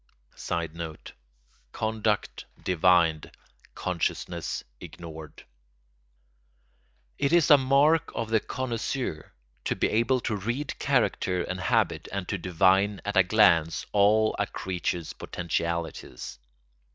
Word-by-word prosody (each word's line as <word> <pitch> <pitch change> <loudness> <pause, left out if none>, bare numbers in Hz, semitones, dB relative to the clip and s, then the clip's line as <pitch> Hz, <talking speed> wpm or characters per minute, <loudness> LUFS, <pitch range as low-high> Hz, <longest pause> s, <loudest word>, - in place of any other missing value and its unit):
[Sidenote: 85 -1 -5 0.6
Conduct 110 -1 -1 0.2
divined, 85 -3 +3 0.4
consciousness 90 -2 -2 0.2
ignored.] 80 -2 -10 1.7
It 140 - +1
is 170 -4 +4
a 145 - +10
mark 140 +4 +3
of 115 -1 -3
the 110 - +4
connoisseur 120 - -4 0.3
to - - 0
be - - +1
able 115 +4 +2
to 110 - -1
read 120 +9 -3
character 110 -9 +1
and 95 +2 -4
habit 95 - +1
and 100 -2 -4
to 100 - -2
divine 95 +3 +2
at 105 0 -3
a 95 - +7
glance 90 -5 +3
all 105 +2 +4
a - - +1
creature's 90 -2 -3
potentialities. 85 -7 -4
95 Hz, 105 wpm, -27 LUFS, 85-110 Hz, 1.7 s, a